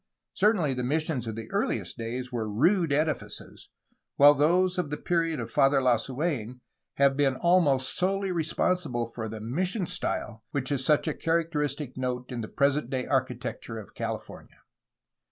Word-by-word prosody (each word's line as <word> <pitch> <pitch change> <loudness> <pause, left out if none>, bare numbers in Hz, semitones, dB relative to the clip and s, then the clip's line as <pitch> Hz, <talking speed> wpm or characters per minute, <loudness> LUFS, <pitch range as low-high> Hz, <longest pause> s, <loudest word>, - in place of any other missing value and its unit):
Certainly 185 -10 +2
the 125 -1 -3
missions 145 -2 -1
of 110 - -4
the 110 0 -6
earliest - - -1
days 125 +2 -4
were 115 -3 -2
rude 165 - +2
edifices, 140 -8 -2 0.5
while 145 +1 +8
those 180 +6 +2
of 175 - -1
the 150 - -3
period 165 -4 0
of 115 -1 -5
Father 135 0 +4
Lasu^n 130 0 -1 0.4
have 140 -1 +4
been 135 -2 +2
almost 145 -6 +3
solely 195 +1 0
responsible 165 -6 0
for 115 -1 -6
the 110 0 -6
"mission 180 - -1
style" 120 -10 -3
which 140 -1 -2
is 135 -2 0
such 150 +3 +2
a 155 - +1
characteristic 150 -5 -1
note 125 0 -3
in 120 -2 -3
the 110 - -5
present 140 -1 +1
day 130 -1 -2
architecture 125 -3 -2
of 110 - -10
California. - - -7
140 Hz, 155 wpm, -27 LUFS, 125-165 Hz, 0.5 s, while